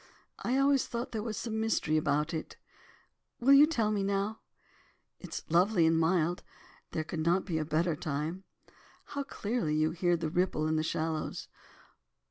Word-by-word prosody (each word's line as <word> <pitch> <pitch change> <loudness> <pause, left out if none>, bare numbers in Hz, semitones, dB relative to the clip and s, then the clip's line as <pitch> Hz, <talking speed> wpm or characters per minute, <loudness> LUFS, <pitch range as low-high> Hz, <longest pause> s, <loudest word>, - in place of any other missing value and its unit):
I 255 +2 0
always 275 -1 +3
thought 235 +1 -4
there 220 - -3
was 215 -1 -4
some 220 -2 -3
mystery 220 -8 +1
about 150 +1 +1
it. 160 - -5 0.8
Will 270 +4 +5
you 285 +2 +8
tell 225 -9 0
me 205 -2 0
now? 200 +2 -1 0.8
It - - -10
is - - -4
lovely 175 +2 +3
and 165 0 +4
mild, 170 +1 +1 0.5
there 155 - -2
could 160 +1 -5
not 170 +4 +2
be 165 -4 -1
a 155 - -2
better 160 +2 +1
time. 155 +6 -3 0.7
How 285 - -2
clearly 215 - -2
you 155 +1 +2
can 165 - -8
hear 175 0 +2
the 160 -2 -3
ripple 175 -3 +1
in 155 0 +1
the 155 - +1
shallows. 160 0 -3
175 Hz, 175 wpm, -31 LUFS, 155-220 Hz, 0.8 s, you